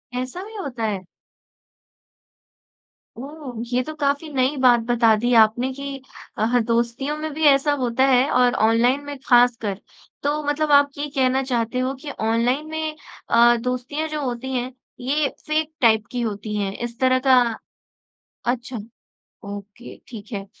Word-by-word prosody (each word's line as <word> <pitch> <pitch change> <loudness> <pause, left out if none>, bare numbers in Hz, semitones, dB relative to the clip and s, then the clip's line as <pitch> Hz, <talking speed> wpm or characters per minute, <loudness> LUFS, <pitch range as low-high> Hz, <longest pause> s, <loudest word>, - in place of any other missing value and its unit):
ऐसा 255 +9 -4
भी 440 +1 -11
होता 260 - -5
है? 200 -3 -2 2.1
ओह! 275 -3 -8
ये 250 - +3
तो 310 - -7
काफ़ी 285 +1 -1
नई 265 +2 +1
बात 245 -2 +6
बता 230 -2 +4
दी 240 +2 0
आपने 240 +4 +2
कि 280 0 -6 0.4
अ, 215 - 0
हाँ, 245 +1 +2
दोस्तियों 240 +6 -1
में 310 0 -4
भी 315 +1 -4
ऐसा 280 +1 +4
होता 245 +2 +1
है 255 +3 +4
और 250 -1 +3
ऑनलाइन 245 +5 +2
में 285 -1 -6
खासकर। 240 -5 +3 0.4
तो 295 +1 0
मतलब 295 +1 0
आप 285 0 +6
ये 290 +1 -3
कहना 265 0 +2
चाहते 240 -1 -1
हो 255 +1 -1
कि 290 - -5
ऑनलाइन 235 +6 0
में 315 -1 -3 0.3
अ, 235 +1 +6
दोस्तियाँ 255 +5 -3
जो 305 -1 -3
होती 255 +1 -4
हैं, 250 0 -2 0.3
ये 280 +3 0 0.2
फ़ेक 310 0 0
टाइप 220 -3 +4
की 245 -1 -2
होती 210 -1 -4
हैं। 200 -1 -1
इस 235 +1 -6
तरह 255 0 +3
का 255 -1 +7 1.1
अच्छा, 245 0 -6 0.7
ओके 205 +3 -9
ठीक 220 -2 -10
है। 195 -1 -4
255 Hz, 155 wpm, -22 LUFS, 235-285 Hz, 2.1 s, का